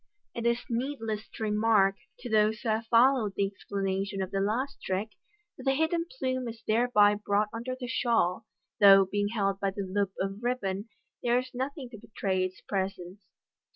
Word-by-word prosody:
It 235 0 -2
is 235 0 0
needless 230 -3 -3
to - - -5
remark, 210 -2 +3 0.3
to 245 - -6
those 215 -1 +2
who 235 - -2
have 220 +1 0
followed 235 -3 +4
the 200 - +2
explanation 195 0 -3
of 185 - -6
the 195 - -1
last 230 +8 -1
trick, 190 +3 -2 0.5
that - - -9
the 270 0 +3
hidden 335 +3 0
plume 255 -1 -1
is 225 0 -8
thereby 215 -2 +4
brought 210 0 0
under 240 +3 -4
the 250 - -4
shawl, 230 -5 0 0.3
though, 195 -1 +8
being 205 +2 -1
held 195 -3 -1
by 195 - 0
the 200 +1 -4
loop 195 0 -1
of 195 +2 -3
ribbon, 210 -4 -2 0.3
there 240 0 +2
is 255 0 -3
nothing 265 +2 -4
to 220 - -10
betray 190 -4 -2
its 185 0 -5
pre 190 -1 -1
sence. 185 +1 -13
215 Hz, 185 wpm, -29 LUFS, 195-240 Hz, 0.5 s, though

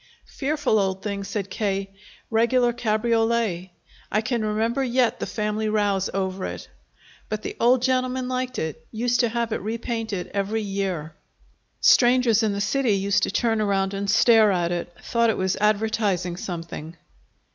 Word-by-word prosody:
"Fearful 290 -6 0
old 190 -1 -1
thing," 200 -1 -3
said 200 -1 -4
K., 195 -2 -2 0.4
"regular 240 +2 +3
cabriolet. 225 -4 0 0.4
I 215 - +2
can 235 -1 -1
remember 225 +5 0
yet 250 -2 +1
the - - -3
family 215 0 -2
rows 205 -3 +1
over 190 -1 -2
it. - - -7 0.6
But 215 0 -3
the - - -5
old 245 +1 +4
gentleman 255 0 0
liked 255 0 -3
it 160 0 -4
used 240 +2 0
to 240 -2 +3
have 235 0 -2
it - - -3
repainted 225 -2 -4
every 205 +2 -1
year. 190 -6 -3 0.7
Strangers 245 -3 +5
in 220 -2 +1
the 200 0 -2
city 255 +1 +1
used 200 +1 +1
to - - +1
turn 225 -3 +1
around 195 -1 0
and 200 0 -3
stare 220 -2 +5
at 175 -2 0
it 175 0 -3
thought 235 -1 +2
it 220 - 0
was 190 0 0
advertising 210 -4 +1
something!" 170 -2 -7
215 Hz, 155 wpm, -24 LUFS, 195-235 Hz, 0.7 s, Strangers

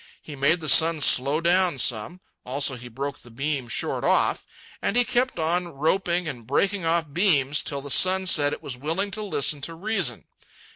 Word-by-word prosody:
He 150 - -10
made 140 +5 +1
the 155 - -5
sun 160 +3 +5
slow 140 +2 +3
down 175 -2 +2
some; 125 +9 -1 0.2
also, 135 +1 -2
he 125 0 -10
broke 135 +4 -6
the 120 - -16
beam 135 +1 -3
short 110 - -2
off. - - +1 0.3
And 200 - -1
he 245 - +4
kept 250 -1 0
on 175 +2 -1
roping 170 +3 -1
and 120 -6 -7
breaking 195 +7 0
off 165 -3 -1
beams 150 -6 +2
till 140 -1 -5
the 140 0 -5
sun 190 +4 +4
said 145 -5 +2
it - - -7
was 130 - -5
willing 165 +9 -3
to 215 +1 -5
listen 150 -7 0
to 165 +4 -5
reason. 180 - -2
155 Hz, 190 wpm, -24 LUFS, 140-180 Hz, 0.3 s, sun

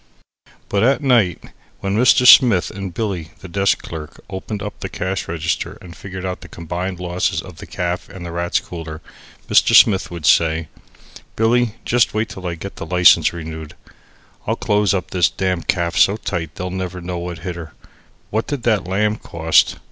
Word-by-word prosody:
But 100 - 0
at 135 +6 +2
night, 115 - +2 0.4
when 100 0 -1
Mr. 125 +2 +4
Smith 120 -8 +7
and 95 -1 -6
Billy, 95 -3 -4
the 95 - -9
desk 100 +2 +1
clerk, 80 -2 -8
opened 100 +2 -5
up 105 - -7
the - - -5
cash 95 -1 -3
register 85 0 -3
and 85 -2 -12
figured 95 -1 -7
out 90 -1 -4
the - - -11
combined 90 +2 -5
losses 90 0 -1
of - - -9
the - - -10
caff 90 0 -3
and 95 -3 -9
the 85 - -6
Rats' 85 +1 0
Cooler, 80 -3 -8 0.5
Mr. - - +4
Smith 95 -4 +6
would 85 -3 -7
say: 80 0 +3 0.7
"Billy, 115 0 +2
just 120 -2 +2
wait 110 0 0
till 95 -1 -7
I 85 - -3
get 95 +4 -8
the - - -5
license 90 +1 +5
renood, 80 -2 -8
and - - -25 0.5
I'll 115 - +1
close 105 -4 +1
up 90 - -4
this 90 -4 +3
damn 95 -2 -1
caff 85 -1 -1
so 100 +2 +4
tight 90 -6 -4
they'll 90 0 -4
never 95 -1 -4
know 90 0 -5
what 85 0 -5
hit 90 -2 -3
her. 85 -2 -9 0.6
What 110 +2 -1
did 145 -5 -4
that 110 -6 +1
lamb 105 +3 0
cost? 80 -4 +2
90 Hz, 185 wpm, -19 LUFS, 85-105 Hz, 0.7 s, Smith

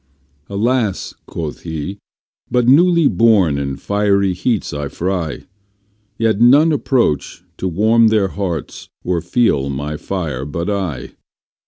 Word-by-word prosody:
Alas, 110 0 -1
quoth 80 -3 -5
he, 80 +4 -5 0.5
but 125 -1 +1
newly 170 +3 +5
born 100 - +3
in 70 -1 -3
fiery 100 0 +1
heats 105 +4 -1
I 75 0 -3
fry, 85 0 -3 0.7
Yet 110 -1 +1
none 145 +7 +6
approach 120 - 0
to 95 - -3
warm 110 +6 +3
their 105 -3 +2
hearts 90 -6 -5
or 90 -2 -1
feel 75 - +1
my 75 +2 -4
fire 80 -8 -4
but 85 +7 -3
I! 95 -9 -3
100 Hz, 125 wpm, -18 LUFS, 80-115 Hz, 0.7 s, none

